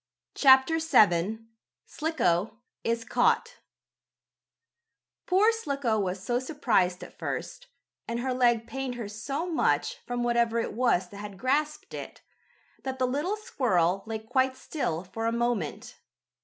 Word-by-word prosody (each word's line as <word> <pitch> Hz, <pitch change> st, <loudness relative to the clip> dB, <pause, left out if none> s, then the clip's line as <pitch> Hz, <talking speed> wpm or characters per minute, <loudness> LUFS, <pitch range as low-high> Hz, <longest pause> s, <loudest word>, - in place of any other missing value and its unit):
CHAPTER 265 Hz, +4 st, +5 dB
VII 215 Hz, -, +3 dB, 0.4 s
SLICKO 230 Hz, -, 0 dB, 0.3 s
IS 230 Hz, 0 st, -1 dB
CAUGHT 480 Hz, +1 st, +1 dB, 1.7 s
Poor 395 Hz, +5 st, +5 dB
Slicko 280 Hz, -, -1 dB
was 190 Hz, -1 st, -2 dB
so 240 Hz, 0 st, 0 dB
surprised 230 Hz, -, 0 dB
at -, -, -13 dB
first, -, -, -5 dB, 0.4 s
and 235 Hz, +1 st, -2 dB
her 260 Hz, 0 st, -1 dB
leg 240 Hz, -2 st, +3 dB
pained 265 Hz, 0 st, -4 dB
her 235 Hz, -4 st, -5 dB
so 270 Hz, +10 st, -4 dB
much, 360 Hz, +7 st, 0 dB
from 245 Hz, 0 st, -2 dB
whatever 235 Hz, -1 st, +2 dB
it 230 Hz, -, -1 dB
was 220 Hz, -6 st, +2 dB
that 200 Hz, -, -11 dB
had 205 Hz, -1 st, -8 dB
grasped 295 Hz, +7 st, -1 dB
it, -, -, -8 dB, 0.6 s
that 265 Hz, -1 st, -4 dB
the 255 Hz, -, +1 dB
little 295 Hz, +11 st, -1 dB
squirrel 195 Hz, -, +1 dB
lay 225 Hz, 0 st, -2 dB
quite 260 Hz, +4 st, 0 dB
still 175 Hz, -, -3 dB
for 225 Hz, +5 st, -4 dB
a -, -, +1 dB
moment. 235 Hz, -8 st, -2 dB
240 Hz, 135 wpm, -28 LUFS, 215-280 Hz, 1.7 s, CHAPTER